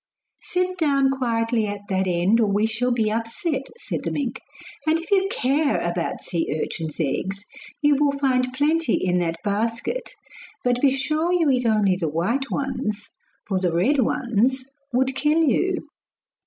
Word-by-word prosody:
'Sit 365 0 -1
down 275 -4 +3
quietly 230 -3 0
at 205 0 -4
that 190 0 0
end 180 +5 +2
or 220 - +3
we 205 +2 +2
shall 225 +3 0
be 225 -3 +1
upset,' 245 +6 -2
said - - -4
the - - -1
mink; 265 -3 -3 0.5
'and 315 +1 +4
if 335 +4 -9
you 390 -1 +3
care 280 -1 +1
about 170 0 -2
sea 165 -3 -2
urchins' 160 -2 -4
eggs, 190 +7 -2 0.4
you 290 0 +5
will 285 0 +3
find 255 -2 +1
plenty 305 +5 +2
in 180 -1 +1
that 165 -1 -1
basket. 230 - -2 0.5
But 245 0 +1
be 280 - +6
sure 305 +6 0
you 335 -5 +3
eat 250 -2 +1
only 205 -4 +3
the 165 -4 -1
white 230 - -1
ones, 245 -6 -3 0.4
for 190 -3 0
the 180 -2 0
red 215 - +2
ones 255 0 +1 0.3
would 260 +2 +1
kill 300 +4 +2
you. 350 +3 +1
250 Hz, 165 wpm, -23 LUFS, 205-285 Hz, 0.5 s, be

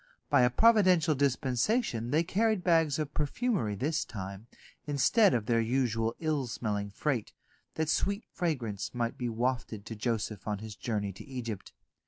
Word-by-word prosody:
By 140 -3 +6
a 125 - +5
providential 185 - +5
dispensation 130 - 0
they 155 +5 +3
carried 210 +2 +1
bags 165 -5 +3
of 155 -2 -3
perfumery 150 - 0
this 150 +8 0
time, 100 +1 -7 0.4
instead 180 - +4
of 110 -3 -1
their 115 -1 +2
usual 115 -1 0
ill 155 -5 0
smelling 105 -3 -2
freight, 120 +2 -2 0.4
that 160 0 0
sweet 200 +6 0
fragrance 125 - -2
might 120 -1 -1
be 120 -1 -3
wafted 115 -3 -2
to 115 - -6
Joseph 110 -2 -2
on 105 -1 -1
his 110 +1 -8
journey 105 -3 -2
to 95 - -10
Egypt. 120 -7 -6
125 Hz, 155 wpm, -30 LUFS, 110-160 Hz, 0.4 s, By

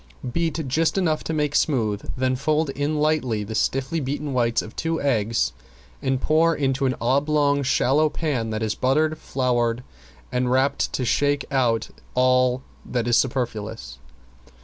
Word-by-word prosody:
Beat 165 -3 -1
just 160 +8 +1
enough 160 -5 +1
to - - -2
make 150 -2 0
smooth, 110 -10 0
then 130 0 +1
fold 150 +2 0
in 145 +2 -1
lightly 140 -8 +1
the 105 +2 -6
stiffly 135 +8 0
beaten 145 +1 -3
whites 120 -2 +1
of 110 - -11
two 165 0 -1
eggs 115 -5 +1 0.5
and 130 -2 0
pour 160 +3 +3
into 135 -1 0
an 130 - 0
oblong 140 +3 +2
shallow 140 +3 +2
pan 140 -9 -2
that 110 0 -2
is 110 -1 0
buttered, 155 +6 +1
floured 120 -2 0 0.5
and 125 0 0
rapped 130 +2 +1
to 130 - -1
shake 145 +3 +1
out 120 -4 +1 0.3
all 125 0 +3 0.2
that 120 -2 -2
is 120 - +3
superfluous. 110 - -2
135 Hz, 150 wpm, -23 LUFS, 120-150 Hz, 0.5 s, pour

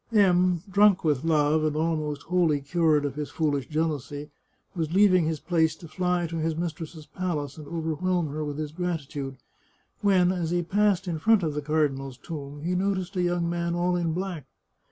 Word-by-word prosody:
M, 180 -5 +4
drunk 200 0 +4
with 150 -4 +1
love, 155 -1 +3
and 155 -1 0
almost 155 -2 -1
wholly 170 -4 +2
cured 150 0 +2
of 145 - -2
his 150 0 -4
foolish 145 -5 -1
jealousy, 150 -2 -2 0.4
was 160 -3 -2
leaving 185 -4 +5
his 160 -1 -1
place 160 -1 +1
to 165 - -12
fly 180 +1 0
to 165 0 -4
his 160 0 -1
mis 170 0 -2
tress's 160 -1 -9
palace 165 -6 -3
and 150 - -9
overwhelm 165 +1 -1
her 155 +2 -3
with 145 -1 -4
his 155 -1 -4
gratitude, 150 -6 -4 0.6
when, 185 -3 +4
as 175 -3 -2
he 175 0 0
passed 195 +1 +1
in 165 -3 -2
front 220 +2 +4
of 155 -2 0
the 150 - -2
cardinal's 140 -3 -1
tomb, 145 -1 -7
he 175 +2 0
noticed 185 0 -1
a 180 - +1
young 175 -1 +1
man 170 0 -1
all 175 +1 +1
in 170 -2 0
black. 175 -5 -4
165 Hz, 190 wpm, -26 LUFS, 150-180 Hz, 0.6 s, leaving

